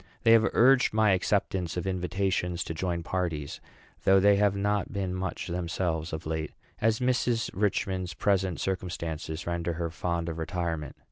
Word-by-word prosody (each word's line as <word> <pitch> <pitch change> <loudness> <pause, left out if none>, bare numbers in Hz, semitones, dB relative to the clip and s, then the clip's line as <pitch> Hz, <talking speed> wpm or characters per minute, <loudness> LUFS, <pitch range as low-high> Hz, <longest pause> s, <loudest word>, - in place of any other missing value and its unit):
They 115 - +6
have 115 -1 +6
urged 130 -1 +5
my 110 -2 +4
acceptance 95 -2 0
of 90 - -2
invitations 90 -1 -1
to - - -5
join 85 0 -2
parties; 80 -6 -3 0.4
though 95 0 +6
they 100 +1 +5
have 100 -1 +3
not 100 0 0
been 95 -3 -2
much 95 0 -3
themselves 85 -2 -2
of 80 +1 -5
late, 80 -1 -3 0.3
as 110 0 +2
Mrs. 125 -2 +1
Richman's 95 -3 -1
present 95 -4 +1
circumstances 85 -3 -3
render 85 0 -2
her 85 0 -3
fond 85 0 -2
of 80 -1 -4
retirement. 80 -3 -3
90 Hz, 155 wpm, -28 LUFS, 85-100 Hz, 0.4 s, They